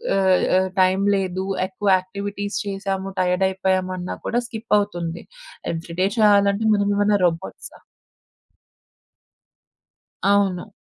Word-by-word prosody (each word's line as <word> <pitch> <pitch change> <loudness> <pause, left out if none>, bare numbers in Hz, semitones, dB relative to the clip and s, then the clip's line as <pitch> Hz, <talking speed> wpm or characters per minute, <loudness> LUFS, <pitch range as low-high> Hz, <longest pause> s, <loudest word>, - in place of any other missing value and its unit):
ఆహ్, 190 -2 +3
ఆహ్, 190 0 +1
టైం 185 +1 +3 0.2
లేదు 190 -1 -2 0.2
ఎక్కువ 195 +2 -5
యాక్టివిటీస్ 200 +2 -5
చేసాము 195 -1 -3
టైయర్దయిపోయామన్నా 185 0 0
కూడా 240 +1 0
స్కిపవుతుంది. 205 -7 -2 0.5
ఎవ్రీ 165 +1 -7
డే 190 - +4
చేయాలంటే 205 0 +4
మనమేమైనా 205 0 +2
రోబోట్సా? 165 - -4 2.4
అవును. 200 0 +1
195 Hz, 90 wpm, -22 LUFS, 185-205 Hz, 2.4 s, డే